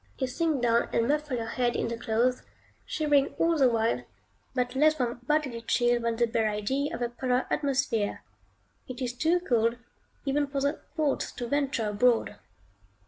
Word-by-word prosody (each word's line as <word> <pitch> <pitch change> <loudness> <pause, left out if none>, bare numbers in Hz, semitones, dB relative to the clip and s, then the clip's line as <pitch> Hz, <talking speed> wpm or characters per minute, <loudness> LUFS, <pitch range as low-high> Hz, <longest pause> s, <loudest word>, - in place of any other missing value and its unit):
You 265 - 0
sink 290 0 -1
down 235 0 +2
and 230 - +1
muffle 295 -2 0
your 230 - -3
head 240 +1 0
in - - 0
the 235 - -3
clothes, 235 +2 0 0.5
shivering 290 -3 +1
all 330 0 +3
the 270 -5 +4
while, 225 - 0 0.5
but 250 -1 0
less 305 +3 +4
from 245 -3 -2
bodily 290 -6 0
chill 240 +1 +2
than 230 0 0
the 235 +1 +2
bare 225 -1 0
idea 265 +8 -1
of 240 - -3
a 240 - -1
polar 250 +1 0
atmosphere. 270 -7 0 0.6
It 255 -1 -7
is 250 -2 -2
too 325 +7 +2
cold 235 -8 +1 0.5
even 285 +1 +1
for 280 0 -2
the 280 +1 -1 0.2
thoughts 300 -3 0
to 245 - -5
venture 275 -5 0
abroad. 230 +3 +2
250 Hz, 175 wpm, -28 LUFS, 230-285 Hz, 0.6 s, the